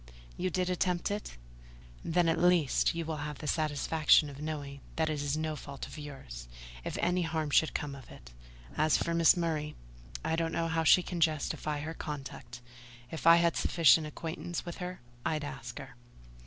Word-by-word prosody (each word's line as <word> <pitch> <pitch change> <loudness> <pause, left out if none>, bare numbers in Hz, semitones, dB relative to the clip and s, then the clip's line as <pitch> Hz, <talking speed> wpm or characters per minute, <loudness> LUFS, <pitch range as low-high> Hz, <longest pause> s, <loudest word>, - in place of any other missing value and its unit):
"You 185 - -1
did 180 +1 0
attempt 180 0 0
it? 205 - -5 0.7
Then, 175 +1 +2
at 165 0 +2
least, 175 -4 +3
you 165 -1 -2
will 160 -1 -3
have 150 0 -5
the - - -8
satisfaction 155 0 +3
of 140 +1 -10
knowing 145 -3 -5
that 160 -1 +1
it 150 -2 -2
is 145 +1 -1
no 155 0 -2
fault 140 -2 -7
of - - -10
yours, 65 - -9 0.4
if - - -4
any 180 +1 +1
harm 160 -3 -1
should 160 - +3
come 145 -2 -2
of 135 -3 -11
it. - - -13 0.4
As 155 0 +3
for 170 - -1
Mrs. 165 +1 +5
Murray, 155 -3 -1 0.5
I 160 - +1
don't 165 0 -1
know 165 0 0
how 165 0 +1
she 180 +3 +6
can 175 -1 -4
justify 155 -1 0
her 160 +2 -4
conduct: 135 -5 -7 0.5
if 160 0 -3
I 165 - +10
had 170 -1 +3
sufficient 165 -2 +4
acquaintance 165 +2 -5
with 175 - -6
her, 180 -1 -6 0.2
I'd 155 -1 -1
ask 135 -4 -7
her." 130 -2 -8
155 Hz, 185 wpm, -31 LUFS, 145-170 Hz, 0.7 s, I